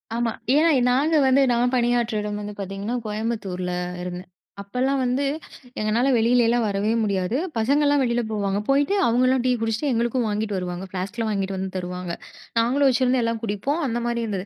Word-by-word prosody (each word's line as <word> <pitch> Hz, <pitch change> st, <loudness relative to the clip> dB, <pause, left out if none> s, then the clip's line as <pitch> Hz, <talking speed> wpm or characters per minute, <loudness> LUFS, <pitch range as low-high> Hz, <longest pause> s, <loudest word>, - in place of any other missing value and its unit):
ஆமா. 235 Hz, -1 st, 0 dB, 0.2 s
ஏன்னா, 320 Hz, +3 st, +5 dB, 0.2 s
நாங்க 295 Hz, +6 st, +2 dB
வந்து 265 Hz, +1 st, +4 dB
நான் 245 Hz, +2 st, +1 dB
பணியாற்றிட 240 Hz, -3 st, +1 dB
இடம் 210 Hz, 0 st, -3 dB
வந்து 210 Hz, 0 st, -6 dB
பார்த்தீங்கன்னா, 195 Hz, +4 st, -4 dB
கோயம்புத்தூர் 210 Hz, -4 st, -3 dB
ல -, -, -2 dB, 0.3 s
இருந்தேன். 180 Hz, 0 st, -7 dB, 0.3 s
அப்பலாம் 255 Hz, +7 st, -1 dB
வந்து, 250 Hz, +3 st, 0 dB, 0.6 s
எங்களால 220 Hz, +5 st, +1 dB
வெளிலலாம் 235 Hz, +1 st, +3 dB
வரவே 205 Hz, +1 st, 0 dB
முடியாது. 200 Hz, +2 st, 0 dB, 0.2 s
பசங்கள்லாம் 285 Hz, +5 st, +3 dB
வெளில 240 Hz, -1 st, +1 dB
போவாங்க, 200 Hz, -2 st, -1 dB
போயிட்டு, 280 Hz, +6 st, +3 dB
அவங்கலாம் 255 Hz, +2 st, +3 dB
டீ 255 Hz, -, +3 dB
குடிச்சிட்டு 225 Hz, +6 st, -1 dB
எங்களுக்கும் 235 Hz, +1 st, 0 dB
வாங்கிகிட்டு 210 Hz, 0 st, -2 dB
வருவாங்க. 180 Hz, 0 st, -4 dB
ஃப்ளாஸ்க் 190 Hz, +4 st, -5 dB
ல -, -, 0 dB
வாங்கிட்டு 195 Hz, -2 st, -2 dB
வந்து 190 Hz, 0 st, -3 dB
தருவாங்க. 180 Hz, -1 st, -4 dB, 0.5 s
நாங்களும் 265 Hz, +5 st, +3 dB
வச்சுருந்து, 255 Hz, 0 st, +2 dB
எல்லாம் 230 Hz, 0 st, -1 dB
குடிப்போம். 230 Hz, -, -2 dB
அந்தமாரி 235 Hz, -1 st, -1 dB
இருந்தது 195 Hz, -4 st, -3 dB
230 Hz, 160 wpm, -23 LUFS, 200-250 Hz, 0.6 s, ஏன்னா